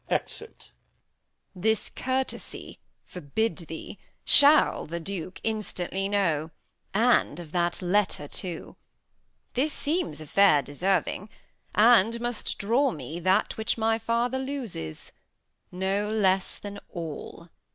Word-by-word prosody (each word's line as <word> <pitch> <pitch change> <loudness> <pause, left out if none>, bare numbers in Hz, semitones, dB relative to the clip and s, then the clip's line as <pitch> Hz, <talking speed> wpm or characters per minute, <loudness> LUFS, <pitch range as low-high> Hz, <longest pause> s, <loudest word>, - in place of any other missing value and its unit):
Exit. 450 - -4 0.8
Edm. 180 - -11
This 220 +2 +1
courtesy, 260 +1 -4 0.3
forbid 180 +7 -2
thee, 160 -2 -8 0.3
shall 290 +2 +6
the 170 +2 -4
Duke 185 +1 -5
Instantly 195 -3 -2
know, 165 -7 +1 0.4
and 220 -7 +2
of 165 -3 -9
that 175 0 0
letter 180 -5 +1
too. 175 +1 -5 0.8
This 290 +5 +1
seems 290 - -1
a 155 - -7
fair 150 -3 +4
deserving, 185 +7 -1 0.5
and 230 0 +5
must 240 -1 -2
draw 240 +7 +2
me 155 - -6
That 185 +4 +1
which 220 +1 0
my 225 0 +1
father 235 +3 0
loses 245 - -5 0.6
no 195 +3 -1
less 195 -3 +1
than 205 0 -8
all. 170 0 -7
200 Hz, 115 wpm, -27 LUFS, 170-230 Hz, 0.8 s, shall